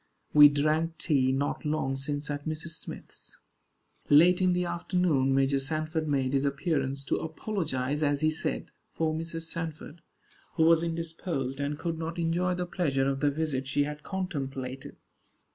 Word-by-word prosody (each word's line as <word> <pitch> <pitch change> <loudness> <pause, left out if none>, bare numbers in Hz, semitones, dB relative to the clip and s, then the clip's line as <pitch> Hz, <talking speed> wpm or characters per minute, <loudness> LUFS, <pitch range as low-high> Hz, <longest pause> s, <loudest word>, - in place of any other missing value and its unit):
We 145 -1 +10
drank 155 +3 +1
tea 135 -6 +2
not 140 +2 -1
long 150 -3 0
since 145 +2 -3
at 145 +1 -4
Mr. 155 +1 -3
Smith's. 165 - -5 0.7
Late 175 +5 +6
in 185 -1 +4
the 180 0 0
afternoon 170 -7 +1
Major 135 0 +3
Sanford 155 +3 -2
made 135 -2 0
his 135 0 +2
appearance, 140 -2 -1
to - - 0
apologize, 155 -5 -2
as 145 -1 +1
he 155 0 +3
said, 155 - -3 0.2
for 160 -1 0
Mrs. 165 +1 -4
Sanford, 165 -1 -5 0.5
who 160 - +3
was 165 0 +6
indisposed, 165 -5 -3
and 145 +1 -2
could 165 0 -3
not 165 +1 -4
enjoy 175 +2 +1
the 180 0 -2
pleasure 140 -7 0
of 135 0 0
the 145 - +3
visit 140 -3 -2
she 145 +1 +2
had 150 +1 -5
contemplated. 135 -8 -4
155 Hz, 160 wpm, -29 LUFS, 140-165 Hz, 0.7 s, We